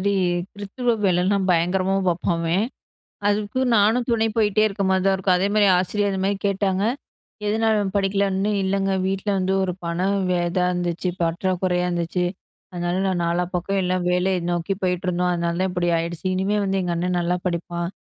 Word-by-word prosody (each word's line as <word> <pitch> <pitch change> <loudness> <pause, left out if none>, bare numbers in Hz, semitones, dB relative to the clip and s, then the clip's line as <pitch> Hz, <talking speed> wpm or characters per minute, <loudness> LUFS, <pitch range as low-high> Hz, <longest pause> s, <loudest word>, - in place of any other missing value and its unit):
மாரி 200 +2 +1 0.5
க்த்துருவ 235 +4 -1
வேலைலாம் 185 +2 +2
பயங்கரமா 180 +3 +1
பார்ப்பான் 170 0 0
அவன். 170 +5 +1 0.6
அதுக்கு 210 +4 0
நானும் 225 +4 +3
துணை 225 -1 +2
போயிட்டே 215 -1 +3
இருக்க 200 -1 -2
மாரி 190 -1 +2
தான் 195 - +4
இருக்கும். 190 -1 +2
அதே 195 +2 +1
மாரி 210 -1 +5
ஆசிரியர் 205 +2 0
இந்த 190 - -2
மாரி 200 0 +1
கேட்டாங்க, 195 -1 0 0.6
எதுனால 220 +1 +2
அவன் 195 -1 -2
படிக்கலன்னு 195 0 +1
இல்லங்க 195 0 0
வீட்ல 195 +2 -2
வந்து 190 0 0
ஒரு 185 - -1
பணம் 180 +4 0
வே 180 - +2
இதா 180 0 +1
இருந்துச்சு 175 0 -2
பற்றாக்குறையா 180 +1 0
இருந்துச்சு. 175 +1 -1 0.5
அதனால, 175 +1 -2
நான் 185 -2 0
நாலா 170 +1 +1
பக்கம் 195 +3 -1
எல்லாம் 180 0 0
வேலையை 180 +1 +1
நோக்கி 175 +3 -1
போயிட்டுருந்தோம். 180 -1 0
அதனால 170 0 -1
தான் 190 - 0
இப்டி 175 -1 0
ஆயிடுச்சு 170 +2 -4
இனிமே 195 +3 0
வந்து 195 0 0
எங்க 175 -1 -2
அண்ண 180 +2 -1
நல்லா 175 +1 0
படிப்பான் 170 0 -2
185 Hz, 170 wpm, -23 LUFS, 175-200 Hz, 0.6 s, மாரி